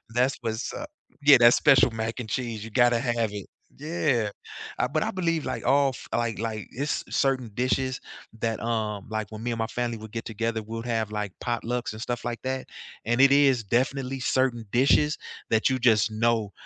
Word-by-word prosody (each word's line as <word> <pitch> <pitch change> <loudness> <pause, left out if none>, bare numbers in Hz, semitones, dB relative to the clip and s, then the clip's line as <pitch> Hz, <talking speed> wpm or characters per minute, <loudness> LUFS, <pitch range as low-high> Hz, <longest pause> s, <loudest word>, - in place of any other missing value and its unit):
That's 125 +2 +2
was, 110 +1 -3
uh 300 - -5 0.4
Yeah, 145 0 +9
that 120 0 +7
special 130 -5 +5
mac 110 +2 -4
and 115 -3 -6
cheese, 115 -4 -3
you 115 - -7
gotta 120 0 +4
have 120 -3 0
it. 100 -2 -6 0.3
Yeah, 145 -8 0 0.5
uh, - - +2
but 155 +2 0
I - - -2
believe 165 -4 -1
like 130 - -3
all 140 +2 +4
f 130 - -9
like 115 -2 -1
like 110 -2 -4
it's 140 +5 -2
certain 130 -4 +1
dishes 130 +1 0 0.4
that, 115 0 -1
um 110 -3 -2
like, 110 -1 -3
when 110 +1 -8
me 120 - -1
and 115 - -3
my 110 - 0
family 120 -1 -2
would 110 -1 -10
get 115 +1 -5
together, 115 0 -2
we'd 115 +2 -6
have 110 -3 -1
like 105 -3 -3
potlucks 120 0 -2
and 110 - -8
stuff 120 +1 -4
like 120 -1 -3
that, 130 0 -3 0.4
and 120 +3 +2
it 135 0 +7
is 135 -4 +4
definitely 130 +4 -1
certain 125 -3 +1
dishes 145 +4 +3 0.3
that 110 0 +3
you 130 - +1
just 115 -3 +4
know, 110 -1 +1
120 Hz, 200 wpm, -26 LUFS, 110-130 Hz, 0.5 s, Yeah